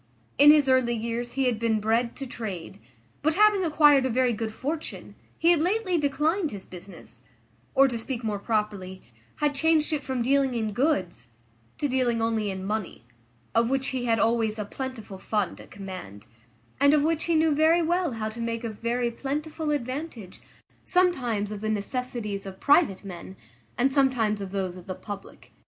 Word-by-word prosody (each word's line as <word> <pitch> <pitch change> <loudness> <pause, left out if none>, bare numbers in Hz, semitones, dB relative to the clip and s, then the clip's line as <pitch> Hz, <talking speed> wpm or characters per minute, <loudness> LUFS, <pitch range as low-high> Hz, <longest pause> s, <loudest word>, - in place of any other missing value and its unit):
In 290 +1 +9
his 295 -2 +6
early 255 -2 +3
years 235 +2 -3
he 270 - 0
had 240 -4 +1
been 225 -1 +1
bred 230 +3 0
to 275 - -6
trade; 200 -6 -6 0.4
but, 310 +2 +1
having 420 -2 +5
acquired 295 -4 +5
a 260 - 0
very 250 0 +2
good 220 0 -3
fortune, 300 +8 -5 0.2
he 335 +1 +4
had 340 - +4
lately 370 +1 +1
declined 300 +5 +1
his 200 -5 -8
business; 175 -9 -11 0.5
or, 275 +1 +6
to 240 -3 -3
speak 240 +1 -5
more 210 -2 -2
properly, 205 -4 -2 0.3
had 295 -1 0
changed 315 +2 +2
it 300 - 0
from 260 -3 -2
dealing 270 0 +2
in 220 -2 -2
goods, 195 - 0 0.5
to 290 - 0
dealing 250 -3 +1
only 225 -2 0
in 190 -1 -5
money, 210 - -4 0.5
of 230 +1 +3
which 270 0 0
he 255 -2 -2
had 230 -1 +2
always 225 -1 +1
a 210 - -3
plentiful 220 -5 -7
fund 205 -2 -2
at - - -15
command, 185 - -9 0.5
and 280 +2 +5
of 290 - +2
which 320 0 +1
he 335 - +1
knew 315 -1 +3
very 320 +3 +4
well 345 -3 0
how 220 -1 -3
to 220 +2 -6
make 230 0 -3
a 230 - -2
very 235 +3 -1
plentiful 300 +5 -4
advantage, 255 - -4 0.4
sometimes 250 - +1
of 205 -1 -6
the 215 - -2
necessities 215 -2 -3
of 190 -1 -9
private 285 - +3
men, 190 -1 -9 0.4
and 265 +3 +2
sometimes 250 -7 +2
of 195 -1 -6
those 190 -2 -3
of 180 - -13
the 185 - -4
public. 205 0 -10
240 Hz, 180 wpm, -26 LUFS, 210-290 Hz, 0.5 s, In